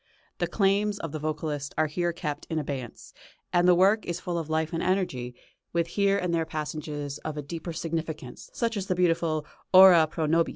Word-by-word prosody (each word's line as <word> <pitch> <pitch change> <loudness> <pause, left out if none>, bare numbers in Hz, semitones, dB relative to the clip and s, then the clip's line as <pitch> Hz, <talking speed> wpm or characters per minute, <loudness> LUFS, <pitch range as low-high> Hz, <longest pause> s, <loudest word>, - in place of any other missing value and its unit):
The - - +1
claims 200 0 +1
of 165 -6 -5
the 155 - -4
vocalist 150 -1 -3
are 155 - +3
here 175 +3 -1
kept 150 -4 -5
in 160 - -2
abeyance, 135 -5 -5 0.4
and 175 0 +4
the 180 - +7
work 200 +5 +4
is 175 0 -4
full 175 -1 -3
of 160 -2 -6
life 160 +1 -1
and 165 - -1
energy, 135 -10 -1 0.4
with 170 -1 0
here 200 +2 +2
and 180 -3 -1
there 165 -1 +2
passages 150 -2 -5
of 155 -1 -5
a 150 - -3
deeper 165 +3 -6
significance, 160 -4 -5
such 230 -2 -1
as 195 -1 -3
the 185 - 0
beautiful 165 -3 +1 0.3
"Ora 185 -4 +8
pro 155 +1 -2
nobis." 165 +2 +2
165 Hz, 200 wpm, -27 LUFS, 155-180 Hz, 0.4 s, Ora